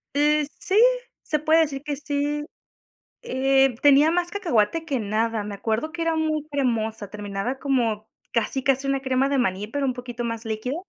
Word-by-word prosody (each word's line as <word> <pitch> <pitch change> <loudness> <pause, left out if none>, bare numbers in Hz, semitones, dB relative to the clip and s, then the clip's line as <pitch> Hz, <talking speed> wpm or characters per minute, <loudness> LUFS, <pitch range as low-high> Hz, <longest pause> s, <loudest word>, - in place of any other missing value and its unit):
Eh, 300 +1 +3
sí, 385 - +1 0.5
se 305 - -1
puede 315 +2 +4
decir 280 -3 -2
que 295 -1 -3
sí. 290 +1 -2 0.8
Eh, 270 0 +2
tenía 290 +2 +6
más 350 0 0
cacahuate 325 - 0
que 280 -6 -1
nada, 220 +1 -1
me 205 0 -6
acuerdo 220 +9 -2
que 335 +1 -6
era 330 -1 +1
muy 310 -1 -1
cremosa, 225 -7 -1
terminaba 205 +4 -4
como 230 -6 0 0.2
casi, 235 +4 -1
casi 270 0 +1
una 275 -1 0
crema 260 0 +1
de 280 0 0
maní, 195 -3 -1
pero 280 +5 -2
un 260 - 0
poquito 245 -1 -6
más 230 0 -4
líquida. 225 +5 -3
270 Hz, 175 wpm, -24 LUFS, 225-295 Hz, 0.8 s, tenía